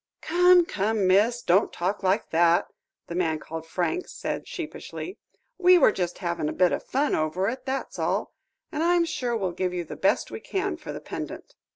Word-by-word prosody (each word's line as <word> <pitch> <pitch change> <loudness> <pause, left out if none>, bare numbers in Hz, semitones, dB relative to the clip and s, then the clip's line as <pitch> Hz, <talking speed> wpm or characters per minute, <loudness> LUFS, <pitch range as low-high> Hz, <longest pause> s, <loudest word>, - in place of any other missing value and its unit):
"Come, 355 +1 +5
come, 210 - 0
miss; 215 +6 +3
don't 185 +4 +3
talk 185 +4 -2
like 190 +2 0
that," 170 +1 +4 0.4
the - - -7
man 165 -3 0
called 160 +1 -8
Franks 190 - -2
said - - -4
sheepishly; 355 +2 -7 0.4
"we 365 0 +7
were 280 - +6
just 180 -3 -3
having 170 -3 -1
a - - -3
bit 180 -1 +3
of - - -1
fun 285 +3 0
over 155 +5 0
it, 260 +3 -7
that's 270 +1 -3
all. - - -1 0.4
And 305 - -2
I'm 345 0 +3
sure 255 -8 -2
we'll 190 -4 -1
give 180 +1 -2
you 175 - -2
the 160 - -8
best - - +1
we - - -5
can 390 -2 -2
for 335 - -8
the - - -7
pendant." - - -7
205 Hz, 195 wpm, -26 LUFS, -, 0.4 s, we